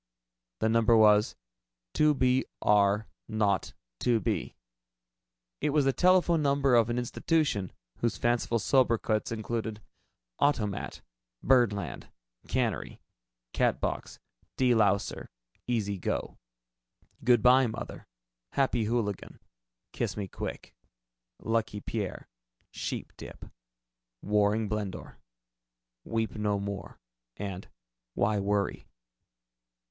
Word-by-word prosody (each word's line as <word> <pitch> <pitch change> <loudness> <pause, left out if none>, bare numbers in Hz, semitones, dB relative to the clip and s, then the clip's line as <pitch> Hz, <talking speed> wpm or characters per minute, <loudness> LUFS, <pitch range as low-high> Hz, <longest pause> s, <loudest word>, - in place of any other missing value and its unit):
The 110 - +3
number 115 0 +4
was: 105 -1 +5 0.6
"2 150 -1 +4
B 130 0 +2 0.2
R 105 +1 +3 0.2
0 105 -3 +2 0.4
2 120 -2 +2
B." 95 - -2 1.1
It - - +1
was 145 -1 +2
the 135 - +3
telephone 180 -1 +4
number 140 -2 +2
of 115 -1 +5
an 120 - -1
institution 125 - 0 0.3
whose 115 -2 -1
fanciful 120 0 +1
sobriquets 115 -3 +1
included: 110 -1 -3 0.6
"Automat," 110 -9 0 0.4
"Birdland," 105 - +1 0.4
"Cannery," - - -2 0.5
"Catbox," - - -1 0.4
"De 130 -1 +3
louser," 100 -3 +1 0.4
"Easy 105 -5 -1
go," - - -3 0.8
"Good 120 -2 +4
by, 125 +1 +6
Mother," 110 - -7 0.5
"Happy 125 -4 +1
Hooligan," 105 -3 -2 0.5
"Kiss - - -2
me 100 -2 -3
quick," - - -7 0.7
"Lucky 115 -2 -1
Pierre," 100 -2 -4 0.5
"Sheepdip," - - -7 0.7
"Waring 105 +1 +2
Blendor," 105 -2 -5 0.9
"Weep 115 -1 -2
no 105 -1 -1
more" 100 0 -6 0.4
and 100 -2 -5 0.5
"Why 105 -1 +1
Worry?" 100 0 -1
110 Hz, 95 wpm, -29 LUFS, 105-125 Hz, 1.1 s, by